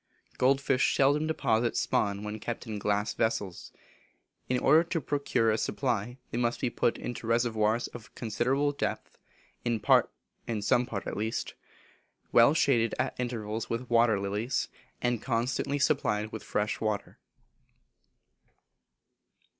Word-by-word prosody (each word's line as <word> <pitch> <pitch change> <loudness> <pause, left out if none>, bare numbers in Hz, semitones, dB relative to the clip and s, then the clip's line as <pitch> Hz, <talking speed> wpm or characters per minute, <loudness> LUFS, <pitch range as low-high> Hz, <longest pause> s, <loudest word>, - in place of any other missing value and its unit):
Gold 135 +2 +4
fish 135 -1 +2
seldom 145 +3 +3
deposit 120 -7 +1
spawn 100 0 0
when 105 +1 -5
kept 120 +3 -5
in 110 -3 -5
glass 105 +1 0
vessels. 100 -5 -2 0.8
In 125 - +2
order 155 +6 +5
to 170 0 -2
procure 140 -6 +1
a 110 - 0
supply, 120 -2 -1
they 120 - -2
must 120 -1 0
be 125 - -1
put 115 - +1
into 120 -2 -6
reservoirs 115 -1 +1
of 120 -3 -10
a - - -23
considerable 130 +6 0
depth, 140 - -4 0.4
in 120 -2 0 0.8
some 120 +3 +2
part 100 -3 -5
at - - -4
least, 110 +2 -2 0.8
well 120 +6 +6
shaded 115 -7 +2
at - - -1
intervals 115 -3 -3
with 120 +1 -4
water 115 -3 +4
lilies, 105 +6 -1 0.3
and 120 -2 +1
constantly 125 +4 -1
supplied 110 -7 +1
with 110 - -6
fresh 105 0 -2
water. 105 -2 -3
115 Hz, 135 wpm, -29 LUFS, 110-130 Hz, 0.8 s, well